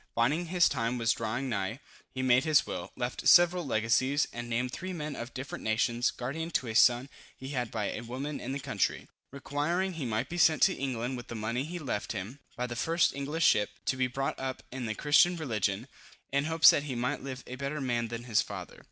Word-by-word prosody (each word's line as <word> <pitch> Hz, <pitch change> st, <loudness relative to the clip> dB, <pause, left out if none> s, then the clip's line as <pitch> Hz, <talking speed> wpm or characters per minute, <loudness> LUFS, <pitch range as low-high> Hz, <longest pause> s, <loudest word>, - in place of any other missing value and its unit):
Finding 150 Hz, +9 st, +1 dB
his 175 Hz, 0 st, +4 dB
time 120 Hz, -2 st, -1 dB
was 115 Hz, -1 st, +2 dB
drawing 115 Hz, +4 st, -2 dB
nigh, 110 Hz, +1 st, -2 dB, 0.4 s
he 130 Hz, -, -2 dB
made 130 Hz, 0 st, +4 dB
his 155 Hz, -2 st, +4 dB
will, -, -, -5 dB
left 125 Hz, 0 st, -3 dB
several 175 Hz, 0 st, +6 dB
legacies, 130 Hz, +3 st, +1 dB
and 120 Hz, 0 st, -6 dB
named 125 Hz, +2 st, -1 dB
three 185 Hz, +7 st, -5 dB
men 150 Hz, -4 st, -4 dB
of 120 Hz, +1 st, -6 dB
different 130 Hz, +1 st, -6 dB
nations, 115 Hz, +2 st, +1 dB
guardian 155 Hz, +7 st, -4 dB
to 140 Hz, -, -1 dB
a 115 Hz, -, -4 dB
son 120 Hz, +3 st, +5 dB, 0.3 s
he 130 Hz, -, -8 dB
had 125 Hz, -4 st, -2 dB
by 105 Hz, -2 st, -2 dB
a -, -, -5 dB
woman 130 Hz, +5 st, -5 dB
in 130 Hz, -, -5 dB
the 140 Hz, -, -3 dB
country, -, -, -1 dB, 0.2 s
requiring 150 Hz, +7 st, -1 dB
he 160 Hz, -5 st, -4 dB
might 110 Hz, +3 st, -1 dB
be 175 Hz, +3 st, -4 dB
sent 160 Hz, -3 st, +5 dB
to -, -, +5 dB
England 130 Hz, -1 st, -3 dB
with 120 Hz, -, -9 dB
the 115 Hz, -, -6 dB
money 115 Hz, +4 st, -2 dB
he 175 Hz, +3 st, -5 dB
left 135 Hz, -11 st, -3 dB
him, 105 Hz, +7 st, -6 dB, 0.2 s
by 125 Hz, -, -1 dB
the 120 Hz, -1 st, -5 dB
first 165 Hz, +9 st, +2 dB
English 150 Hz, +4 st, -1 dB
ship, 105 Hz, -1 st, +4 dB, 0.2 s
to -, -, +1 dB
be 130 Hz, -1 st, +1 dB
brought 135 Hz, +2 st, -3 dB
up 130 Hz, -1 st, -4 dB
in 130 Hz, -2 st, -4 dB
the 110 Hz, -, -2 dB
Christian 150 Hz, +6 st, +4 dB
religion, 110 Hz, -, -1 dB, 0.4 s
in 140 Hz, +1 st, +1 dB
hopes 160 Hz, +1 st, +7 dB
that -, -, +1 dB
he 130 Hz, -, -2 dB
might 125 Hz, +5 st, -1 dB
live 130 Hz, -1 st, -6 dB
a -, -, -8 dB
better 140 Hz, +3 st, -3 dB
man 120 Hz, -3 st, -1 dB
than 115 Hz, +1 st, -6 dB
his 115 Hz, -4 st, +2 dB
father. -, -, -8 dB
130 Hz, 220 wpm, -30 LUFS, 120-145 Hz, 0.4 s, hopes